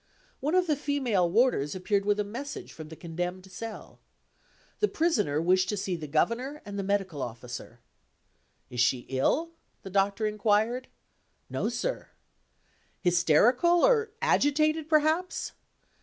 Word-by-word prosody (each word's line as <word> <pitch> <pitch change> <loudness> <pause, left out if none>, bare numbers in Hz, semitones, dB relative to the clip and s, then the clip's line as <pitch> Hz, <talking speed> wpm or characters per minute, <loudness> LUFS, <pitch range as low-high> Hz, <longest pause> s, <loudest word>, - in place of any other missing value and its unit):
One 300 +6 0
of 365 -1 +4
the 310 -3 +1
female 260 - 0
warders 195 - +2
appeared 195 +2 0
with 205 0 +2
a - - +2
message 250 +8 -7
from 155 -1 -9
the 160 - -9
condemned 180 +3 -5
cell. 225 +4 -8 0.8
The 420 - +3
Prisoner 215 - +1
wished 185 +2 +2
to 210 - -1
see 190 -2 -2
the 155 -3 -6
Governor 235 - 0
and 200 0 -5
the - - -1
Medical 195 -7 -1
Officer. 120 0 -7 0.9
"Is 125 - -5
she 120 +1 +3
ill?" 275 - +1 0.3
the 195 - -8
Doctor 200 +2 +1
inquired. 215 +4 +1 0.6
"No, - - -1
sir." - - -3 0.9
"Hysterical? 215 - +4
or 455 -3 +3
agitated, 310 -5 +2
perhaps?" 315 +4 +1
205 Hz, 135 wpm, -28 LUFS, 180-290 Hz, 0.9 s, of